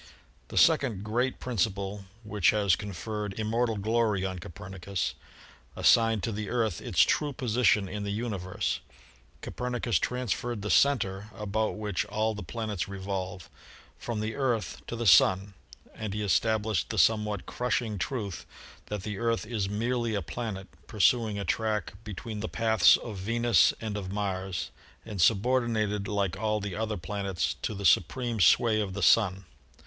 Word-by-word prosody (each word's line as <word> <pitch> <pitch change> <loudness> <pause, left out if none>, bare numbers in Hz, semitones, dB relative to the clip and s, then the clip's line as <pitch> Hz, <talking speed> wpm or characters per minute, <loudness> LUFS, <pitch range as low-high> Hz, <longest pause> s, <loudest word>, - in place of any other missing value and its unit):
The - - -7
second 110 -8 +4
great 120 +5 -1
principle, 100 -3 -2 0.2
which 105 -3 +2
has 100 -4 +3
conferred 105 +1 -5
immor 115 +3 +1
tal 110 -2 -2
glory 110 -1 +1
upon 95 -1 -3
Copernicus, 90 +2 -4 0.6
assigned 115 -3 +4
to 115 - -1
the 105 -1 -4
Earth 115 -7 0
its - - +2
true 150 -2 +2
position 115 -5 +2
in 100 +2 -5
the 100 - -3
universe. 100 -3 -2 0.6
Copernicus 120 -4 -1
transferred 120 -2 -2
the 105 - -1
cen 140 0 +5
ter, 95 0 -5
about 105 +1 -1
which 105 -4 -1
all 110 +2 -1
the 105 - -6
planets 110 -6 -4
revolve, 95 -2 -5 0.5
from 115 -3 -3
the 110 +1 -2
Earth 125 -5 -1
to - - -4
the 120 0 -3
Sun, 95 +1 +5 0.4
and 105 -2 -5
he 105 - -2
established 110 -3 +1
the - - -4
somewhat 105 -3 +2
crushing 120 -4 -2
truth 105 -6 -4 0.4
that 105 -3 -4
the 105 -1 -4
Earth 115 -1 0
is 105 -4 -2
merely 115 +2 -1
a 100 - -1
planet, 100 -1 -5 0.2
pursuing 110 +1 +2
a 100 - -3
track 110 -2 -1
be 105 -4 -7
tween 110 +2 -6
the 110 - -4
paths 110 -5 +5
of 110 -4 -7
Venus 115 -1 +3
and 110 -2 -4
of 95 -3 -4
Mars 95 -2 -3 0.3
and 105 -5 -4
subordinated 110 -1 +2
72 - - -4
ASTRONOMY - - -2
like 100 -4 0
all 110 -1 0
the 100 -2 -4
other 110 -1 -2
planets 100 0 -2
to 110 - -3
the 100 0 -5
supreme 115 +7 +2
sway 110 +5 +5
of 100 -3 -3
the 100 - -2
Sun. 95 -4 +4
105 Hz, 165 wpm, -28 LUFS, 100-115 Hz, 0.6 s, cen